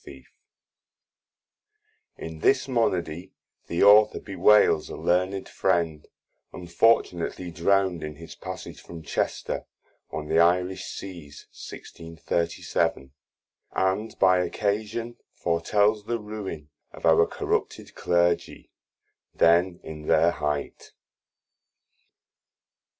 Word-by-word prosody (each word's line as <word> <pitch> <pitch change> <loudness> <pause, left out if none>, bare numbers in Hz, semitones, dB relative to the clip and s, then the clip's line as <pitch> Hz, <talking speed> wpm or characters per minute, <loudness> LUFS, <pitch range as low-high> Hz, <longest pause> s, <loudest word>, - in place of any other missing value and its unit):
Y - - -11
Z - - -13
Lycidas 65 - -21 2.0
In 80 - -10
this 130 - +2
Monody 90 - -1 0.3
the 85 - 0
Author 105 +1 +6
bewails 100 -4 +3
a - - -6
learned 95 +2 0
Friend, 80 -3 -1 0.4
unfortunatly 90 -1 0
drown'd 95 0 +1
in 75 -1 -6
his 80 +2 -11
Passage - - -8
from 85 -2 -10
Chester 70 - -3 0.4
on 75 - -5
the 80 - +2
Irish 90 +2 +2
Seas, 85 -7 -9
1637. 85 -4 -3 0.6
And 95 +4 -1
by 95 -1 +4
occasion 110 +5 -2 0.2
foretels 105 +5 +1
the 120 +1 -1
ruine 105 -8 -7 0.2
of - - -9
our 80 0 +5
corrupted - - -3
Clergy 85 0 0 0.6
then 85 +2 +3
in 75 -1 -9
their 80 +2 +4
height. 75 -2 -4
85 Hz, 100 wpm, -25 LUFS, 80-100 Hz, 2.0 s, Author